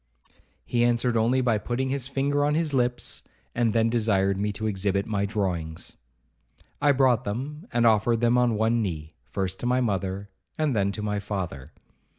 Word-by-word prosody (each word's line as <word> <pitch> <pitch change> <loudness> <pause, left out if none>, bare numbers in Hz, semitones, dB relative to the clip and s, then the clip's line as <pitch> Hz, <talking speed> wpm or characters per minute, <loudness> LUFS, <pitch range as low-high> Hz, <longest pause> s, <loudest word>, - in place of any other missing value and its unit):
He 120 -1 +1
answered 120 0 +2
only 120 +4 +3
by 115 -4 +2
putting 125 +4 -2
his 135 -1 -2
finger 140 +1 0
on 150 +1 +2
his 160 -2 0
lips, 125 -2 0 0.3
and 115 -2 +1
then 115 +1 +2
desired 100 -4 +1
me 105 +1 0
to 110 +2 -4
exhibit 100 -1 0
my 100 -2 -1
drawings. 90 -6 -3 0.9
I 145 - +5
brought 130 -3 +3
them, 140 - -5
and 120 -1 +2
offered 115 +1 +3
them 120 +1 +3
on 125 -2 +3
one 115 +2 +2
knee, 80 -6 -4
first 95 -1 -3
to 120 - -2
my 125 +1 +2
mother, 100 -3 -2 0.3
and 155 -5 +1
then 100 -1 +1
to 105 - -5
my 105 -1 -1
father. 90 -9 -5
115 Hz, 175 wpm, -26 LUFS, 100-125 Hz, 0.9 s, I